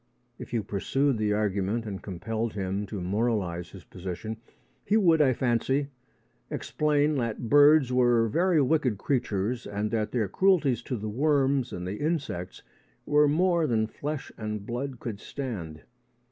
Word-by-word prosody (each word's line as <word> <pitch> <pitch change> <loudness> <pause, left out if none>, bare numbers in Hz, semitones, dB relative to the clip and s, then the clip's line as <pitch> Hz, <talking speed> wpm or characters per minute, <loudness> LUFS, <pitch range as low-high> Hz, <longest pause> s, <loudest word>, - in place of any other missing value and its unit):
If - - -9
you 115 -3 0
pursued 130 +6 0
the 105 -1 +1
argument 105 +2 -1
and 100 -3 -5
compelled 110 +4 -3
him 100 +1 -3
to 100 0 -5
moralise 95 -3 -1
his 95 - -12
position, 95 +5 -6 0.5
he 215 - +2
would, 170 -7 +4
I 135 -3 +5
fancy, 130 +3 0 0.6
explain 150 0 +1
that 115 -4 -1
the - - -8
birds 145 +1 +5
were 120 -2 +4
very 170 - +2
wicked 130 -6 +1
creatures 115 -1 -1
and 105 +1 -2
that 110 -2 -1
their 115 -5 0
cruelties 155 - +2
to 125 - -1
the 110 0 -5
worms 135 +1 +1
and 90 0 -5
the 95 +3 -4
insects 145 - -3 0.4
were 150 0 +4
more 170 +2 +2
than 110 -3 +1
flesh 145 +6 -5
and 105 -2 -4
blood 125 +2 -4
could 110 -4 -5
stand. 95 - -6
115 Hz, 155 wpm, -27 LUFS, 105-145 Hz, 0.6 s, I